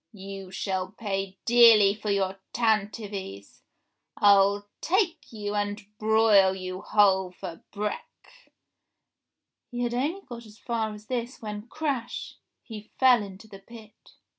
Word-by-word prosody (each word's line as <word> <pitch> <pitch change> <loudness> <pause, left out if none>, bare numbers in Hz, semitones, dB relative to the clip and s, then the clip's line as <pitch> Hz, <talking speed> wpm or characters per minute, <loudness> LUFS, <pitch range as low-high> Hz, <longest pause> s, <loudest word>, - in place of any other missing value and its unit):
You 195 -1 -9
shall 185 0 -3
pay 195 -3 -4
dearly 230 -4 +7
for 210 0 -6
your 195 -1 0
tantivys, 205 - -2 0.6
I'll 200 0 +4
take 340 -4 0
you 205 -2 -5
and 205 0 -2
broil 215 -3 +4
you 185 0 -6
whole 190 -3 +3
for 175 -2 -8
break 210 - -7 0.3
— - - -56
" - - -60
He 245 -1 -5
had 240 0 -1
only 295 +10 -1
got 235 - -10
as 210 0 -16
far 225 -1 -2
as 210 0 -11
this 245 +1 -4
when 210 0 -7
crash 280 -5 -4
— - - -56
he 215 -2 -10
fell 255 -3 +6
into 200 +1 -10
the 195 -2 -12
pit 220 +1 -16
210 Hz, 140 wpm, -26 LUFS, 195-235 Hz, 0.6 s, dearly